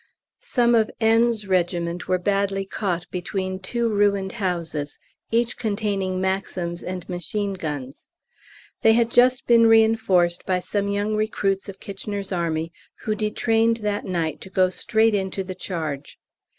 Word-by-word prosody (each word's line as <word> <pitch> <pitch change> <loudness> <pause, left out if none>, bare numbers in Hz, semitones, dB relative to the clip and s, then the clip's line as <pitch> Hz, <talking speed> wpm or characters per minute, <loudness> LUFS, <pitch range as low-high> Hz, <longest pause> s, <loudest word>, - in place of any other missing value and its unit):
Some 240 - +3
of 220 -2 +3
N.'s 225 -1 +3
regiment 175 -1 0
were 185 - +2
badly 195 +1 0
caught 180 -3 -2
between 185 +1 -3
two 235 +5 -1
ruined 200 -2 +1
houses, 170 -8 -3 0.3
each 235 +1 +1
containing 200 -4 -1
Maxims 185 -2 -2
and 180 -1 -6
machine 195 +3 -3
guns. 145 -7 -6 0.7
They 225 - +6
had 230 0 +2
just 250 +2 +4
been 230 -1 +6
reinforced 220 -6 +4
by 185 -1 +2
some 200 +2 -2
young 205 +1 0
recruits 200 -2 -1
of 195 - -9
K.'s 200 0 -6
Army 165 -2 -1 0.3
who 215 - 0
detrained 225 +2 +1
that 205 0 -1
night 170 -4 -2
to 190 - -9
go 185 -1 +3
straight 220 +3 +2
into 195 -1 -1
the 185 0 -6
charge. 160 -6 -5
195 Hz, 140 wpm, -23 LUFS, 180-220 Hz, 0.7 s, They